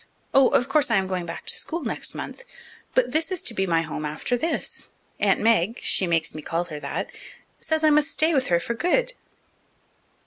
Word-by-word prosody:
Oh, 270 -1 +6
of 245 - +2
course 280 0 +2
I 230 - +3
am 190 -1 +2
going 185 -2 -3
back 165 - -7
to - - +3
school 335 0 -3
next 225 - -3
month, 485 - -6 0.5
but - - +3
this 320 +4 0
is 370 - -2
to 235 - -1
be 195 -3 -1
my 165 -1 +2
home 155 -1 -5
after 155 +11 -2
this. 315 +6 -3 0.3
Aunt - - +3
Meg 225 0 +2
she 190 - +4
makes 165 -2 +1
me 155 - -7
call 165 +3 -1
her 155 -4 -8
that 140 - -4 0.5
says 315 0 -1
I 310 - +5
must 300 +1 +3
stay 320 +2 +2
with 265 -3 +1
her 170 -1 +3
for 235 - -3
good." 480 - +1
230 Hz, 210 wpm, -24 LUFS, -, 0.5 s, Oh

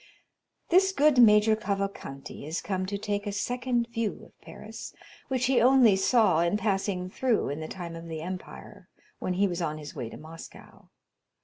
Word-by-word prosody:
This 380 +2 +5
good 300 -6 +3
Major 215 -1 +6
Cavalcanti 195 -12 -5
is 160 +3 -2
come 185 -1 -3
to 200 +1 -3
take 205 0 -3
a - - -1
second 245 +3 -1
view 230 -3 -2
of - - -23
Paris, - - -10 0.3
which 260 -1 0
he 250 -2 +3
only 250 -4 +6
saw 195 -3 +3
in 170 +4 +2
passing 195 -3 -1
through 235 - 0
in 145 +2 -4
the 155 - -5
time 170 -2 -7
of 165 0 -9
the 160 -1 -5
Empire, 180 +2 -8 0.3
when 180 - -2
he 200 +2 +3
was 175 -1 -3
on 155 -2 -2
his 150 -1 -9
way 115 - -5
to - - -10
Moscow. 160 +1 -13
200 Hz, 180 wpm, -28 LUFS, 170-235 Hz, 0.3 s, Major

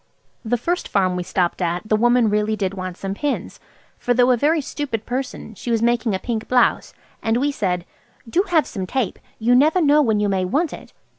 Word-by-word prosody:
The 245 +1 0
first 345 +9 -2
farm 185 -3 +1
we 180 - -2
stopped 175 0 -1
at 175 +3 -2
the 215 - +3
woman 240 +1 +3
really 210 +1 +1
did 195 -2 -2
want 185 -2 -6
some 195 0 -4
pins, 290 +7 -3 0.4
for 245 - 0
though 250 +1 +4
a - - +5
very 300 +7 +2
stupid 265 -6 -4
person, 250 -2 -4
she 230 - -7
was 230 -1 +1
making 235 -3 +1
a - - 0
pink 225 +2 -4
blouse, 250 -1 +2 0.3
and 225 +1 +1
we 285 +3 +1
said– 180 -9 -2 0.4
"Do 335 +11 +2
have 325 -3 +3
some 190 -3 -5
tape! 245 -1 -2 0.2
You 235 +2 +2
never 305 +8 +4
know 300 -2 +4
when 220 -6 +2
you 210 - +1
may 190 -2 0
want 285 - 0
it." - - -11
230 Hz, 215 wpm, -21 LUFS, 195-260 Hz, 0.4 s, a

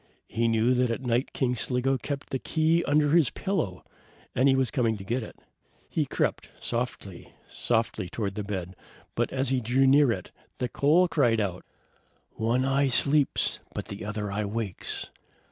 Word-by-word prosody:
He 115 +1 0
knew 115 +2 +3
that 125 -1 +2
at 115 +3 -3
night 120 +2 0
King 125 -2 0
Sligo 125 +2 +1
kept 140 +2 -5
the 130 - -1
key 165 +3 +2
under 145 0 +3
his 160 -7 +5
pillow, 155 - -2 0.5
and 130 +3 +3
he 135 - +4
was 130 -2 +1
coming 115 -6 +1
to 95 - -8
get 120 +6 -1
it. 110 - -9 0.6
He - - 0
crept - - -1
softly, 115 -6 -4
softly, 110 -5 -1
toward 100 0 -3
the 105 - -4
bed, 95 -3 -5 0.4
but - - -1
as 135 -1 0
he 130 -1 +1
drew 125 +4 +2
near 140 -1 +5
it, - - -4 0.3
the 125 - -2
coal 165 +6 +4
cried 130 -9 +2
out: 95 -4 -2 0.7
"One 120 +4 0
eye 135 +1 +2
sleeps, 140 +3 +2 0.2
but - - -5
the 100 - -6
other 105 -1 -3
eye 105 +1 -1
wakes! 105 -2 -4
125 Hz, 175 wpm, -27 LUFS, 110-135 Hz, 0.7 s, his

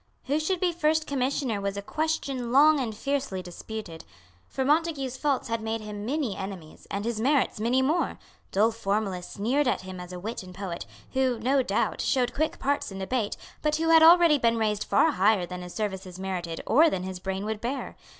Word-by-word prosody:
Who 285 +3 0
should 355 +4 0
be 360 -1 +2
First 315 -1 +1
Commissioner 260 -5 -1
was 200 0 -2
a - - -2
question 275 -3 -2
long 295 +3 +6
and 225 -5 -3
fiercely 275 -8 -2
disputed. 175 -1 -8 0.4
For 265 - -2
Montague's 295 -3 +1
faults 280 -1 0
had 230 -1 -2
made 225 0 -2
him 210 0 -6
many 270 -6 -1
enemies, 190 -5 -8
and 200 +2 -3
his 230 -2 -2
merits 270 -2 +2
many 245 +4 +2
more, 315 +6 0 0.3
Dull 215 +4 +3
formalists 200 -4 -2
sneered 255 +8 +1
at - - +1
him 185 -1 -8
as 180 0 -8
a 180 - -6
wit 220 +6 -5
and 185 -1 -11
poet, 185 -3 -5 0.3
who, 260 -2 +1
no 265 +4 +2
doubt, - - 0
showed 250 -3 +1
quick 310 +2 -1
parts 280 -5 -1
in 195 - -7
debate, 205 +3 -2 0.2
but 300 0 +1
who 325 +1 0
had 325 -1 +7
already 330 -2 +7
been 230 -1 +2
raised 210 -2 0
far 200 - +4
higher 195 0 +3
than 180 0 -7
his 180 0 -9
services 190 -4 -4
merited 180 -3 -4
or 315 +7 +5
than 185 -10 -2
his 185 -1 -5
brain 190 +2 -3
would 215 0 -3
bear. 260 +3 -4
230 Hz, 200 wpm, -27 LUFS, 195-280 Hz, 0.4 s, had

